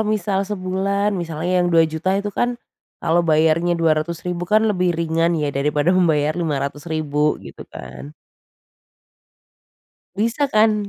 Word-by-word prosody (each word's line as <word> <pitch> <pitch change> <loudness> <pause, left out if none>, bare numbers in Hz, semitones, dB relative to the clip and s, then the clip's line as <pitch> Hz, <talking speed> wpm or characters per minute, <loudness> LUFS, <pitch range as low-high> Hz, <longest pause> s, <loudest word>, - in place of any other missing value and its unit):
misal 210 -3 0
sebulan 200 +1 -1
misalnya 175 0 -1
yang 175 - +1
Rp2.000.000 165 0 +2
itu 205 +1 -3
kan 240 +4 -1 0.5
kalau 170 +2 +3
bayarnya 165 +1 +2
Rp200.000 170 +2 -1
kan 215 +1 +4
lebih 180 -5 +1
ringan 165 +1 +1
ya, 150 -2 -1
daripada 145 +4 +1
membayar 155 -5 +2
Rp500.000 150 0 -1
gitu 70 - -11
kan. 65 +3 -10 2.0
Bisa 230 +7 0
kan? 215 -3 +2
170 Hz, 115 wpm, -20 LUFS, 155-195 Hz, 2.0 s, kan